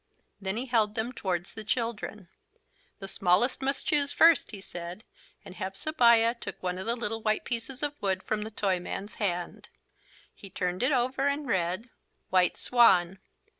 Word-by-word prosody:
Then 195 +2 -2
he 250 - -2
held 220 -4 +1
them 230 +2 -2
towards 185 -6 -3
the 220 - -7
children. 210 -4 -3 0.7
"The 195 - -7
smallest 195 +8 +2
must 270 +1 -1
choose 285 -1 +3
first," 330 0 +5
he 205 - -7
said, 175 +1 -8 0.4
and 185 - -10
Hepzebiah 230 - +3
took - - -6
one 180 0 -2
of 190 - -6
the 235 - +1
little 225 -2 -3
white 215 0 0
pieces 250 +3 -4
of 290 0 -2
wood 190 -2 -1
from 215 -1 -2
the 215 - -4
Toyman's 195 0 -2
hand. 175 -3 -3 0.6
He 195 - -11
turned 180 0 -2
it 255 +4 +3
over 260 +1 +1
and 285 +1 -1
read: 190 +1 -1 0.4
"White 185 -1 +3
Swan." 190 -7 +4
215 Hz, 165 wpm, -28 LUFS, 185-245 Hz, 0.7 s, first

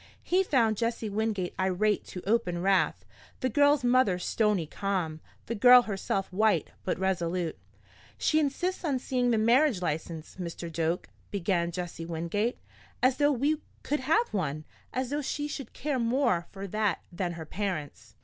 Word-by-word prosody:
He 365 +2 +3
found 235 - +2
Jesse 230 -1 -1
Wingate 205 -3 -1
irate 190 +3 +1
to 180 - -8
open 215 -6 +1
wrath, 195 0 +2 0.4
the 255 - +1
girl's 285 +3 +4
mother 245 -6 +4
stony 205 -1 +1
calm, 175 -2 -2 0.3
the 235 - -3
girl 245 +3 +8
herself 195 -2 -2
white 205 -4 +2
but 185 - -1
resolute. 180 -2 -1 0.6
"She 310 - +2
insists 335 +6 -1
on 290 -6 +1
seeing 250 -1 0
the 230 - +3
marriage 240 +1 +4
license, 160 -1 -4
Mr. 170 -2 -6
Doak," 165 +2 -1 0.2
began 175 -3 0
Jesse 170 -1 -5
Wingate. 170 +8 -1 0.5
"As 255 0 +4
though 290 0 +4
we 290 +4 +1 0.2
could 295 +2 0
have 325 - +2
one! 155 -6 -2 0.3
As 255 0 -2
though 295 +1 0
she 290 +1 -2
should 275 -5 -6
care 285 -2 -2
more 235 -7 +1
for 195 0 -7
that 210 +1 -1
than 175 0 -2
her 165 -1 -7
parents!" 155 - -4
210 Hz, 160 wpm, -29 LUFS, 175-255 Hz, 0.6 s, girl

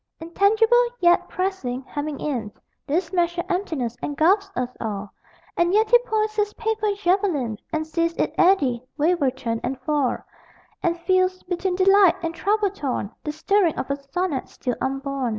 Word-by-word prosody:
Intangible, 435 +8 +3 0.2
yet 345 -2 +3
pressing, 365 -10 -3
hemming 290 +2 -5
in, 240 -8 -3 0.4
This 330 +4 -1
measured 345 -1 0
emptiness 320 - -2
engulfs 365 +8 +2
us 250 -5 -3
all, 205 -2 -4 0.4
And 345 +3 +2
yet 435 +1 +3
he 485 - +8
points 435 -3 -1
his 415 -1 0
paper 440 -1 -1
javelin 350 - 0
And 315 -1 -1
sees 335 +1 -1
it - - -1
eddy, 275 -11 +3
waver, 310 -2 +2
turn, 235 -3 -3
and 260 +1 -3
fall, 285 -2 0 0.6
And 340 0 0
feels, 370 +1 +1
between 360 +1 -2
delight 390 -1 +5
and 330 0 -2
trouble 405 +3 +1
torn, 265 - -3
The 300 - -2
stirring 335 +2 +1
of 265 - -3
a - - +1
sonnet 280 +1 -3
still 250 -3 -3
unborn. 270 -1 -2
340 Hz, 155 wpm, -23 LUFS, 270-390 Hz, 0.6 s, he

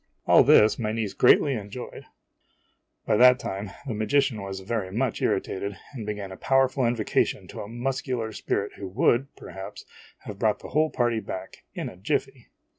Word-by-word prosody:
All - - +7
this 110 +3 +5
my 110 -2 -1
niece 110 -3 -2
greatly 140 - +5
enjoyed. 110 +2 -7
IMAGINOTIONS - - -39
By - - +2
that 125 +1 +7
time, 100 -3 -5 0.2
the 130 - -3
magician 110 +1 +1
was 95 -1 -6
very 95 -2 -3
much 120 +3 -1
irritated 100 0 -1 0.2
and 115 -6 -7
began 105 -2 -4
a 95 - -8
powerful 135 0 +2
invocation 115 -3 0
to - - -7
a 100 - -7
muscular 120 -1 -3
spirit 100 -1 -2
who 100 - -6
would, 120 +6 +2
perhaps, 95 0 -9 0.4
have 100 -2 -9
brought 105 -1 +2
the - - -11
whole 155 +1 +2
party 120 -4 0
back, 95 -2 -8
in - - -3
a - - -10
jiffy! - - -2
110 Hz, 175 wpm, -26 LUFS, 100-125 Hz, 0.4 s, All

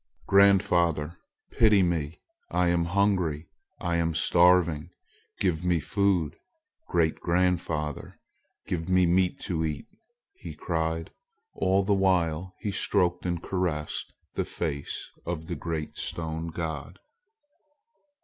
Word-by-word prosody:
"Grandfather! 85 -5 +3 0.4
pity 105 -4 +5
me. 85 -3 -1 0.3
I 90 -1 +2
am 85 -1 +2
hungry. 90 -4 +1 0.3
I 85 -1 -1
am 85 -1 0
starving. 85 -2 +4 0.5
Give 90 -4 0
me 90 -2 +2
food. 95 -2 0 0.5
Great 80 -2 +1
grandfather, 85 -4 -1 0.5
give 85 -1 -3
me 90 -1 +4
meat 90 +1 +2
to 80 -3 -2
eat!" 75 -3 -3 0.5
he 380 - -9
cried. 80 -1 -2 0.4
All 95 +1 +2
the 100 +1 +2
while 95 -2 +1
he 105 - -2
stroked 90 -3 +1
and 85 -1 -2
caressed 85 -5 -2 0.2
the - - -1
face 70 -4 -4
of 80 -2 -4
the 85 +1 -4
great 80 -1 -4
stone 80 0 -3
god. 80 -1 -5
85 Hz, 115 wpm, -27 LUFS, 80-90 Hz, 0.5 s, pity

